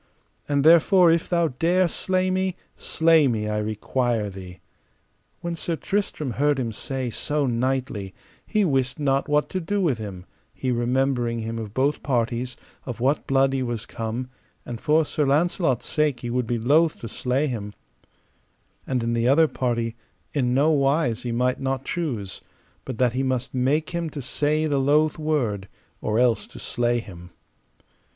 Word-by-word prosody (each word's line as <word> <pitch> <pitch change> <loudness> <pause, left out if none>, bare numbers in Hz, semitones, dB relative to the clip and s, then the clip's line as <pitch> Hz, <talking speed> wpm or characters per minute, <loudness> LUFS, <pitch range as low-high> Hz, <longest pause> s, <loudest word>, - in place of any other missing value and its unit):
And 140 -1 +2
therefore 170 +2 +6
if 165 0 +1
thou 170 -2 +2
dare 175 +7 +2
slay 185 +2 0
me, 185 -1 0 0.2
slay 160 -2 +3
me, 110 -4 -1
I 105 0 -1
require 110 +1 -1
thee. 90 -1 -10 0.8
When 170 0 -3
Sir 165 0 -2
Tristram 160 -7 -2
heard 145 +4 +1
him 120 -4 -2
say 130 +2 -4
so 145 +5 -1
knightly, 125 -5 -2 0.3
he 215 -2 +1
wist 135 -5 0
not 140 0 +1
what 150 0 +2
to 185 - -2
do 200 +4 -1
with 150 - +1
him; 95 -4 -7 0.3
he 130 - -2
remembering 120 -1 0
him 115 +1 -4
of 110 -2 -7
both 140 +3 +1
parties, 120 -1 -1 0.3
of 120 -3 -6
what 135 +5 +1
blood 135 0 +3
he 135 - 0
was 120 -3 -3
come, 115 +3 -4 0.4
and 120 -1 -6
for 155 +1 +3
Sir 150 - -1
Launcelot's 145 - +1
sake 150 -5 0
he 120 - -4
would 125 -1 -1
be 120 - 0
loath 150 +8 +3
to 115 - -5
slay 125 +6 -1
him; 105 -7 -4 1.1
and 125 -3 0
in 115 0 0
the 115 0 +1
other 155 +5 +5
party 115 -4 -2 0.4
in 125 -4 +1
no 145 +4 +4
wise 140 -4 +2
he 120 - -3
might 125 +2 +1
not 135 0 -2
choose, 120 - -3 0.4
but 130 - -5
that 125 -1 +2
he 130 - 0
must 130 -2 -1
make 140 +5 +1
him 170 -2 -2
to 150 - -7
say 150 +4 0
the 145 -3 +1
loath 150 +3 +2
word, 125 -11 -1 0.3
or 105 - 0
else 120 -2 +2
to - - -13
slay 120 0 0
him. 90 -6 -8
130 Hz, 170 wpm, -24 LUFS, 120-150 Hz, 1.1 s, therefore